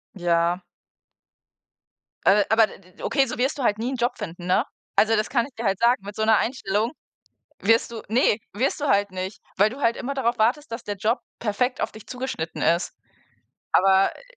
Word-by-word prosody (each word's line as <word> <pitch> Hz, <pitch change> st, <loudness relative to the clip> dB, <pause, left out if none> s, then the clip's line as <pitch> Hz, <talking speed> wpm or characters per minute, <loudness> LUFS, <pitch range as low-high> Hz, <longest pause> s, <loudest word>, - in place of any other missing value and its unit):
Ja. 175 Hz, 0 st, +1 dB, 1.6 s
A 200 Hz, +1 st, +5 dB
aber 220 Hz, 0 st, +5 dB
d -, -, -12 dB
d 185 Hz, -, -21 dB
d -, -, -13 dB
okay, 275 Hz, -1 st, +2 dB
so 250 Hz, -1 st, -5 dB
wirst 265 Hz, +4 st, 0 dB
du 270 Hz, -, -3 dB
halt 210 Hz, -2 st, +2 dB
nie 235 Hz, +3 st, -2 dB
'n -, -, -2 dB
Job 240 Hz, +1 st, 0 dB
finden, 175 Hz, +1 st, -7 dB
ne? 180 Hz, -, +3 dB, 0.3 s
Also, 225 Hz, +1 st, +4 dB
das 215 Hz, -, 0 dB
kann 240 Hz, -3 st, +1 dB
ich 275 Hz, -, -14 dB
dir 230 Hz, 0 st, -5 dB
halt 195 Hz, -1 st, +1 dB
sagen, 235 Hz, -3 st, +3 dB
mit 205 Hz, -, -7 dB
so 220 Hz, -, -1 dB
'ner 220 Hz, -1 st, +5 dB
Einstellung 225 Hz, -2 st, -1 dB, 0.7 s
wirst 225 Hz, +3 st, +3 dB
du 225 Hz, -, -6 dB
ne, 225 Hz, -2 st, +3 dB, 0.2 s
wirst 255 Hz, +8 st, -1 dB
du 290 Hz, -, -1 dB
halt 200 Hz, -2 st, +3 dB
nicht, 185 Hz, +2 st, -5 dB, 0.2 s
weil 205 Hz, +3 st, +4 dB
du 270 Hz, +4 st, -9 dB
halt 230 Hz, -1 st, +2 dB
immer 275 Hz, +2 st, -4 dB
darauf 240 Hz, -3 st, 0 dB
wartest, 240 Hz, +4 st, +1 dB
dass 230 Hz, -, -5 dB
der 205 Hz, -1 st, -4 dB
Job 220 Hz, +6 st, 0 dB, 0.2 s
perfekt 240 Hz, +4 st, -1 dB
auf -, -, -2 dB
dich 220 Hz, -, -13 dB
zugeschnitten 250 Hz, -11 st, -4 dB
ist. 170 Hz, +2 st, +2 dB, 0.8 s
Aber, 190 Hz, +1 st, +4 dB
äh -, -, -16 dB
220 Hz, 210 wpm, -24 LUFS, 195-245 Hz, 1.6 s, A